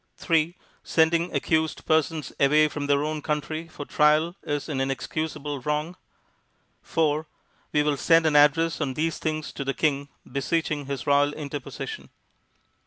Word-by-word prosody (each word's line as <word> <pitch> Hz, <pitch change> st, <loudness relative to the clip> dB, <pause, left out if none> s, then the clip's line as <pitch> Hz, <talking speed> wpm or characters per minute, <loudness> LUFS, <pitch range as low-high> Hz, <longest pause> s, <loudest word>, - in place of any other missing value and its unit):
3. 165 Hz, +1 st, +1 dB, 0.3 s
Sending 165 Hz, +2 st, +2 dB
accused 160 Hz, -1 st, 0 dB
persons 155 Hz, -1 st, +1 dB
away 150 Hz, +2 st, +5 dB
from 145 Hz, -1 st, -4 dB
their 145 Hz, 0 st, +2 dB
own 155 Hz, 0 st, -2 dB
country 155 Hz, +2 st, -3 dB
for 150 Hz, -3 st, -8 dB
trial 155 Hz, +4 st, +3 dB
is 145 Hz, -1 st, -3 dB
an 140 Hz, -4 st, -2 dB
inexcusable 145 Hz, +2 st, -3 dB
wrong. 150 Hz, +5 st, -2 dB, 0.9 s
4. 155 Hz, -1 st, 0 dB, 0.4 s
We 150 Hz, -, +3 dB
will 150 Hz, -1 st, +1 dB
send 165 Hz, +3 st, +4 dB
an 155 Hz, -2 st, +2 dB
address 155 Hz, +3 st, +4 dB
on 135 Hz, -4 st, -1 dB
these 160 Hz, +1 st, -1 dB
things 155 Hz, -1 st, -3 dB
to 140 Hz, -, -4 dB
the 135 Hz, 0 st, -2 dB
King 145 Hz, -2 st, 0 dB, 0.2 s
beseeching 145 Hz, +2 st, -2 dB
his 135 Hz, -4 st, -4 dB
royal 145 Hz, +1 st, +3 dB
interposition. 145 Hz, -, -6 dB
150 Hz, 145 wpm, -25 LUFS, 145-160 Hz, 0.9 s, away